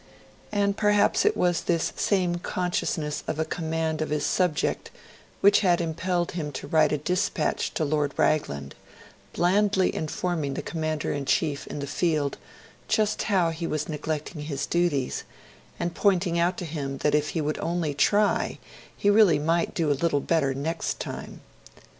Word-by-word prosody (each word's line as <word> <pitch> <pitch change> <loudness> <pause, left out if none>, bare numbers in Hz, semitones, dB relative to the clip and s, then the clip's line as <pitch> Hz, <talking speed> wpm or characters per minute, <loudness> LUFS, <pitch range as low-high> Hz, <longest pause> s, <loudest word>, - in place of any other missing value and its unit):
And 200 -1 +1
perhaps 210 -1 +3
it 425 - +3
was 175 -1 +2
this 170 -2 0
same 180 -4 +1
consciousness 175 -4 -2
of 155 - -2
a 160 - 0
command 160 -1 -2
of 155 - -2
his 150 0 0
subject 180 -5 0 0.5
which 200 - +6
had 180 -4 +3
impelled 175 +1 -1
him 155 -4 -4
to - - -6
write 155 +1 +3
a 150 - +1
dispatch 180 +7 -1
to 155 - +1
Lord 145 -1 0
Raglan, 70 - 0 0.6
blandly 190 +2 +2
informing 155 -3 -2
the - - -4
Commander 155 -2 -2
in 140 -1 -3
Chief 145 0 0
in - - -6
the - - -2
Field 150 -2 0 0.5
just 215 -1 +1
how 185 -5 +2
he 165 +1 -4
was 155 0 -2
neglecting 155 0 -4
his 145 -2 -3
duties, 170 -7 0 0.6
and 170 0 -2
pointing 180 -4 +2
out 175 +2 +1
to 180 - -4
him 140 -4 -4
that 150 - +2
if 150 0 +2
he - - +2
would 150 0 -1
only 165 -3 -1
try 205 +9 +2 0.4
he - - -1
really 205 -7 +6
might 165 +3 0
do 160 -3 +1
a - - +5
little 165 -4 +2
better 140 -3 +1
next 160 +5 -2
time. - - -7
165 Hz, 165 wpm, -26 LUFS, 150-180 Hz, 0.6 s, which